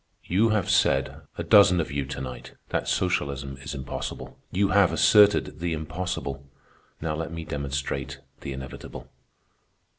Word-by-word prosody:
"You 105 Hz, +6 st, +3 dB
have 105 Hz, -4 st, +1 dB
said, 65 Hz, +1 st, +2 dB, 0.2 s
a -, -, -2 dB
dozen 100 Hz, -3 st, +6 dB
of 80 Hz, -, -2 dB
you 70 Hz, -1 st, -2 dB
to 65 Hz, -, -5 dB
night, 60 Hz, -1 st, -7 dB, 0.2 s
that -, -, -1 dB
socialism 70 Hz, -1 st, -1 dB
is 70 Hz, +1 st, -6 dB
impossible. 65 Hz, -2 st, -6 dB, 0.2 s
You 100 Hz, +1 st, +2 dB
have 100 Hz, -1 st, +4 dB
asserted 105 Hz, -7 st, +5 dB
the 85 Hz, 0 st, -1 dB
impossible, 80 Hz, -3 st, -4 dB, 0.6 s
now 80 Hz, -1 st, -1 dB
let 80 Hz, +1 st, -4 dB
me 85 Hz, -1 st, -6 dB
demonstrate 70 Hz, -2 st, -3 dB, 0.2 s
the -, -, -6 dB
inevitable. 65 Hz, -1 st, -8 dB
75 Hz, 145 wpm, -26 LUFS, 70-90 Hz, 0.6 s, dozen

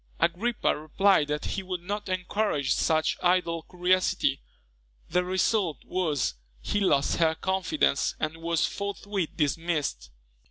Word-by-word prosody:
Agrippa 220 Hz, +7 st, +1 dB
replied 155 Hz, +2 st, +2 dB
that 150 Hz, 0 st, -2 dB
he 195 Hz, -, -2 dB
would 185 Hz, -2 st, -5 dB
not 205 Hz, +2 st, -4 dB
encourage 185 Hz, -5 st, 0 dB
such 155 Hz, -1 st, +1 dB
idle 175 Hz, -2 st, +2 dB
curiosity. 180 Hz, -, +1 dB, 0.7 s
The 180 Hz, -, +2 dB
result 185 Hz, -1 st, +1 dB
was, 155 Hz, -, 0 dB, 0.3 s
he 205 Hz, -, -1 dB
lost 145 Hz, -8 st, +2 dB
her 160 Hz, -1 st, +3 dB
confidence, 190 Hz, -, 0 dB
and 155 Hz, +1 st, -2 dB
was 165 Hz, -1 st, 0 dB
forthwith 200 Hz, -2 st, -3 dB
dismissed. 150 Hz, -, -1 dB
180 Hz, 120 wpm, -27 LUFS, 155-190 Hz, 0.7 s, her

